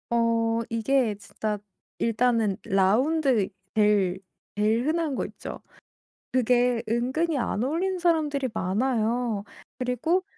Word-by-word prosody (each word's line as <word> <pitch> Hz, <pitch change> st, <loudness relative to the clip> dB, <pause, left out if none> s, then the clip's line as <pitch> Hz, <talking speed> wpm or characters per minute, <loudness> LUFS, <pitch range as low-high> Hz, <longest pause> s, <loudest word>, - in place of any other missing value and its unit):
어 230 Hz, -1 st, +2 dB
이게 230 Hz, 0 st, +1 dB
진짜 210 Hz, +1 st, -4 dB, 0.4 s
일단은 230 Hz, -3 st, +2 dB
라운드 235 Hz, +4 st, +2 dB, 0.3 s
제일 205 Hz, -4 st, +3 dB, 0.4 s
제일 215 Hz, +4 st, +2 dB
흔한 315 Hz, -2 st, 0 dB
거 -, -, -1 dB
있죠? -, -, -8 dB, 0.7 s
그게 245 Hz, -1 st, +2 dB
은근히 265 Hz, +8 st, 0 dB
안 235 Hz, -3 st, -1 dB
어울리는 360 Hz, +7 st, -1 dB
사람들이 300 Hz, -6 st, +1 dB
많아요. 225 Hz, +2 st, 0 dB, 0.3 s
그리고 255 Hz, +9 st, 0 dB
240 Hz, 230 characters per minute, -26 LUFS, 215-275 Hz, 0.7 s, 제일